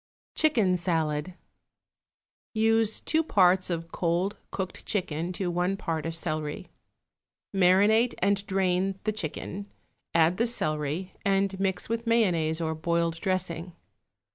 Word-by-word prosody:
=Chicken 225 -13 +3
Salad.= 165 -1 -1 1.2
Use 225 0 +2
two 320 - +1
parts 185 - +3
of 165 -1 -3
cold 175 +4 0
cooked 190 -2 -5
chicken 175 -4 -2
to 180 -1 -2
one 180 +3 0
part 165 -4 -3
of 165 - -2
celery. 155 +2 -2 0.8
Marinate 200 +6 +4
and 200 +1 +1
drain 190 0 +1
the 215 - +1
chicken, 200 +1 -5 0.5
add 165 +2 +4
the 235 - +2
celery, 155 -3 -1
and 195 -1 +1
mix 190 -1 0
with 230 +1 -3
mayonnaise 170 -9 +2
or 160 -1 -1
boiled 165 +1 -1
dressing. 180 -2 -2
185 Hz, 120 wpm, -27 LUFS, 165-200 Hz, 1.2 s, Marinate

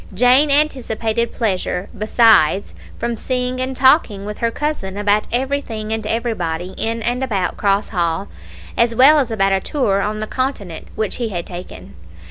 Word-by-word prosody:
Jane 250 +7 +5
anticipated 235 -6 0
pleasure, 190 -4 -2
besides, 215 -4 +3 0.2
from 235 0 -2
seeing 250 +2 -2
and 260 +1 -3
talking 255 -7 +3
with 210 0 -6
her 230 - +1
cousin 230 -8 -3
about 205 +1 +1
everything 240 -4 -2
and 220 -1 -3
everybody 185 -7 -2
in 225 0 -2
and 245 +3 0
about 200 -8 -1
Cross 200 0 0
Hall, 170 -4 -1 0.5
as 235 0 +2
well 285 +5 +7
as 260 -4 0
about 195 -3 +1
a 195 - +2
tour 200 -4 0
on 210 +2 -2
the 215 - -3
Continent 215 -9 -4
which 220 -2 -2
he 235 -2 -2
had 175 -4 -4
taken. 175 - -9
220 Hz, 160 wpm, -19 LUFS, 195-250 Hz, 0.5 s, well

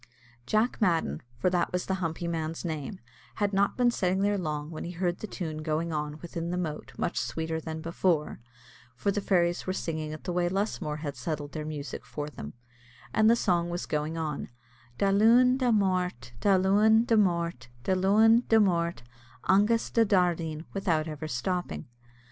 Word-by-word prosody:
Jack 220 +3 +1
Madden, 165 - +1 0.2
for 180 +9 +1
that 180 -1 +1
was 180 0 -1
the 190 - -1
humpy 165 0 -2
man's 165 0 -3
name, 160 +3 -4 0.4
had 205 -1 0
not 200 +1 +2
been 245 -1 +4
sitting 190 -3 0
there 205 +1 +2
long 155 -4 -3
when 155 - -6
he 175 - -5
heard 175 0 -1
the 215 - -5
tune 160 -6 -5
going 160 +1 -1
on 150 0 -3
within 170 0 -4
the 180 - -2
moat 160 -4 -4
much 175 - -1
sweeter 160 0 -3
than 160 0 -5
before; 165 -1 0 0.6
for 165 +11 0
the 205 - -1
fairies 175 -3 +1
were 185 - 0
singing 155 -4 -3
it 155 - -8
the 180 - -3
way 175 0 +1
Lusmore 180 -6 -2
had 145 -3 -4
settled 150 -4 -4
their 155 -1 -5
music 145 -4 -5
for 150 0 -5
them, 75 - -8 0.6
and 220 0 +5
the 230 - +6
song 175 -6 +1
was 175 +1 -3
going 150 +2 -2
on: 155 -3 -3 0.5
Da 195 - +2
Luan, 235 +5 +5
Da 255 -2 +1
Mort, 180 - 0
Da 200 -2 +4
Luan, 210 +4 +4
Da 230 - +3
Mort, 170 - +1 0.2
Da 190 - +1
Luan, 215 +5 +5
Da 225 - +6
Mort, 170 - +1 0.4
augus 210 +4 +3
Da 230 - +4
Dardeen, 170 -6 +1
without 165 -5 0
ever 155 0 -5
stopping. 155 - -2
175 Hz, 185 wpm, -28 LUFS, 155-195 Hz, 0.6 s, the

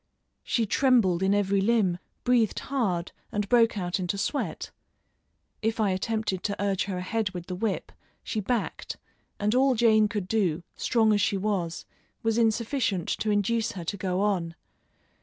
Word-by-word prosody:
She 230 - 0
trembled 215 -7 +3
in 195 +1 +3
every 200 -1 +2
limb, 200 -5 +2 0.2
breathed 245 -4 +2
hard, 195 -10 -1 0.2
and 205 -1 -1
broke 230 -1 +4
out 180 -1 -1
into 185 +2 -2
sweat. 280 +8 -2 0.9
If 225 +1 -1
I 210 -3 +2
attempted 200 0 -1
to 200 +2 -3
urge 200 -1 0
her 190 -2 -3
ahead 205 +3 -1
with 175 -1 -5
the 185 - -5
whip, 195 +2 -2 0.3
she 220 - -2
backed, 230 +2 -2 0.4
and 210 +1 +1
all 260 +1 +4
Jane 220 -2 +4
could 205 -3 -3
do, 185 -6 0
strong 220 -3 +2
as 205 - +2
she 200 - +1
was, 190 -5 -2 0.4
was 225 +1 +1
insufficient 225 - 0
to 215 - -1
induce 210 +2 +1
her 180 - -6
to 165 - -3
go 185 -1 -1
on. 180 -5 0
205 Hz, 160 wpm, -27 LUFS, 185-225 Hz, 0.9 s, broke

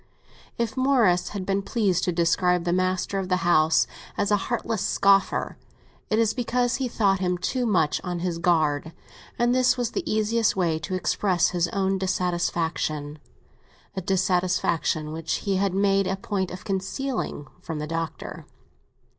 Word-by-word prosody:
If 235 0 -2
Morris 235 -10 +3
had 195 -3 -5
been 195 +1 0
pleased 195 -4 0
to 180 - +1
describe 175 +1 +2
the 175 0 0
master 185 +1 0
of 190 -1 -4
the 185 - +3
house 160 -2 +4 0.3
as 205 - 0
a - - +6
heartless 225 0 -2
scoffer, 195 -1 +2 0.5
it 215 - +2
is 225 -1 +2
because 245 0 0
he 265 -2 -1
thought 200 -5 +1
him 180 -1 0
too 245 +7 -1
much 160 -8 +1
on 180 -1 -3
his 170 -1 -2
guard, 160 -2 +1 0.4
and 240 0 +2
this 255 0 +3
was 240 -2 -1
the 390 - -2
easiest 220 +1 +1
way 170 -4 +1
to 165 +4 -4
express 185 -1 +1
his 175 -1 0
own 195 0 0
dissatisfaction—a 170 -2 -3
dissatisfaction 180 -4 0
which 160 0 -3
he 195 -2 +1
had 195 -1 0
made 195 -1 +2
a 190 - 0
point 195 -1 -2
of 180 - -9
concealing 195 - -3 0.2
from 165 -3 -5
the 150 - -3
Doctor. 165 +1 -5
185 Hz, 155 wpm, -25 LUFS, 175-210 Hz, 0.5 s, a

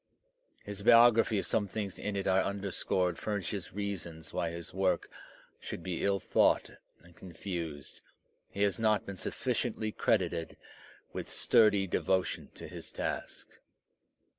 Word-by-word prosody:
His 105 -1 -6
biography, 115 0 +6
if - - -1
some 105 -2 +1
things 100 -1 -4
in 105 - -3
it 100 - -2
are 95 0 +4
underscored, 95 -2 -1
furnishes 100 -2 -3
reasons 85 -6 -5
why 85 - 0
his 85 +1 -7
work 95 -1 0 0.5
should 85 - -7
be 90 -1 -3
ill 100 0 +2
thought - - +3 0.3
and 85 0 -18
confused; 85 -5 -6 0.5
he 100 - -1
has 100 +2 +1
not 110 -1 +2
been 100 -1 -7
sufficiently 110 +4 -2
credited 85 -6 0 0.6
with - - -5
sturdy 105 -3 +4
devotion 95 0 0
to - - -8
his - - -8
task. - - -5
95 Hz, 135 wpm, -31 LUFS, 85-105 Hz, 0.6 s, biography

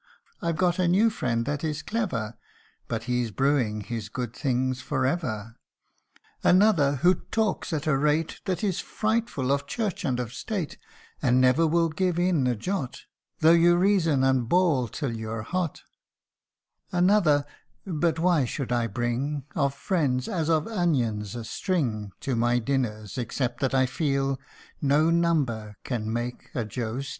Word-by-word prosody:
I've 170 -2 -1
got 180 0 +1
a 180 - +3
new 205 +6 +4
friend 115 - -1
that 145 +1 -2
is 150 -1 -2
clever, 125 - -2 0.5
But 115 -1 -3
he's 125 -1 -1
brewing 125 -3 +1
his 115 +2 -5
good 125 -3 -4
things 130 -1 0
for 130 - -1
ever 115 -7 -2 0.9
Another, 180 -7 +4
who 180 +1 +7 0.2
talks 220 -5 0
at 155 -2 -2
a 155 -3 +3
rate 150 +3 0
That 185 -2 -2
is 195 -4 0
frightful, 215 - -1
of 140 0 0
church 205 -1 -2
and 130 -6 0
of 125 -1 -4
state, 180 - -4 0.4
And 125 +1 +3
never 130 +6 +4
will 165 +1 +2
give 175 +2 0
in 175 -7 +2
a 125 - +1
jot, 140 - -4 0.4
Tho' 160 - +7
you 170 +1 +6
reason 175 -7 +3
and 130 -3 +2
bawl 165 -9 +3
till 120 +1 -3
you're 110 0 -4
hot: 175 +4 -3 1.1
Another 175 -6 +3 0.4
but 170 -2 0
why 170 -3 +3
should 125 +1 -4
I 120 -1 +1
bring 125 +6 -2
Of 140 -4 0
friends, 140 -7 0
as 165 -3 -1
of 160 -2 +2
onions, 125 - 0
a 120 - -5
string 115 - -2
To 130 - -1
my 120 +1 +2
dinners, 115 -4 -2
except 120 0 -2
that 135 -1 0
I 130 0 +4
feel 135 0 0 0.4
No 150 +3 +3
number 140 -12 0
can 110 -4 -3
make 120 +1 -4
a 120 - -1
Joe 115 +3 -3
Steel 140 - -6
140 Hz, 160 wpm, -26 LUFS, 120-170 Hz, 1.1 s, who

